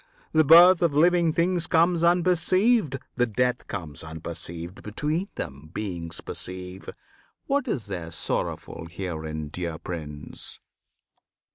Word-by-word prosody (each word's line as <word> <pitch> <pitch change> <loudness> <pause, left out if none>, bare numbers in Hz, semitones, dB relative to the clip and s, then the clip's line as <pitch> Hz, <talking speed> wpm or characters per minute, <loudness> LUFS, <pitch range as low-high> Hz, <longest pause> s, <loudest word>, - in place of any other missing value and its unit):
The 155 - +5
birth 170 +4 +8
Of 165 -5 +2
living 170 +1 +4
things 170 +1 +1
comes 170 +1 +3
unperceived; 180 - +3 0.2
the 125 -1 +3
death 125 +3 0
Comes 75 -5 -6
unperceived; 85 +2 -6
between 150 - -2
them, 70 +3 -6
beings 85 -6 -4
perceive: 90 +1 -6 0.6
What 280 0 0
is 130 - -2
there 90 -5 -5
sorrowful 80 0 -3
herein, 80 -4 -5
dear 85 0 -4
Prince? 75 -4 -5
105 Hz, 115 wpm, -26 LUFS, -, 0.6 s, birth